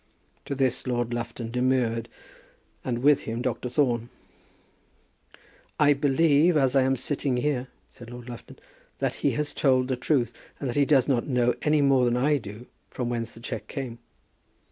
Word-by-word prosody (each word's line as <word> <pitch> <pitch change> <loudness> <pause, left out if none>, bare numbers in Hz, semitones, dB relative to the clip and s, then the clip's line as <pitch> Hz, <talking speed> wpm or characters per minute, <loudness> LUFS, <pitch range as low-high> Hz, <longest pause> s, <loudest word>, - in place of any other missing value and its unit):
To 140 - -3
this 130 -1 0
Lord 120 -1 -1
Lufton 115 -1 -5
demurred, 125 -2 0 0.7
and 120 -1 -3
with 145 0 +6
him 115 +2 -4
Dr. 125 0 -2
Thorne. 120 -3 0 1.7
"I 145 -1 +6
believe, 150 +3 +3
as 135 -2 +2
I 135 - +6
am 135 +1 +2
sitting 135 0 -1
here," 130 -1 -1 0.2
said 120 -3 -12
Lord 120 0 -10
Lufton, 120 -1 -10 0.4
"that - - -1
he - - +2
has 150 0 -2
told 130 -2 +2
the 130 - +1
truth, 125 -2 0 0.3
and 140 - -3
that 120 - -3
he 145 -1 +4
does 135 -3 +3
not 130 -4 +1
know 125 -3 +2
any 150 -1 +3
more 135 -2 +4
than 120 0 +1
I 145 +4 +3
do 110 +1 -10 0.2
from 125 -2 -3
whence 115 -1 -3
the - - -13
cheque 115 -2 -5
came." 125 -4 -6
125 Hz, 170 wpm, -26 LUFS, 120-140 Hz, 1.7 s, with